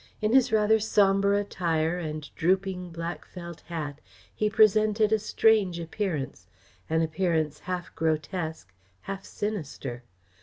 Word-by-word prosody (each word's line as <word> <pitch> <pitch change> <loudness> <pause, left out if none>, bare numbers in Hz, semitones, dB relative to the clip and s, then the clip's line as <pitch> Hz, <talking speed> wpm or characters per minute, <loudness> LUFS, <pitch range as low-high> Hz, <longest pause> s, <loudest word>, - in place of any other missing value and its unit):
In 215 +1 +1
his 265 -3 +5
rather 220 0 +4
sombre 200 -1 +3
attire 170 -4 0
and 155 -2 -5
drooping 185 +1 0
black 170 +1 -5
felt 170 -2 -9
hat, 150 -4 -5 0.3
he 215 - 0
presented 215 0 +4
a 220 - +3
strange 210 -4 +3
appearance; 165 - -3 0.4
an 160 +1 +2
appearance 160 -2 0
half 180 -1 -5
grotesque, 160 - -2 0.3
half 195 0 -5
sinister. 150 - -4
180 Hz, 120 wpm, -27 LUFS, 160-205 Hz, 0.4 s, his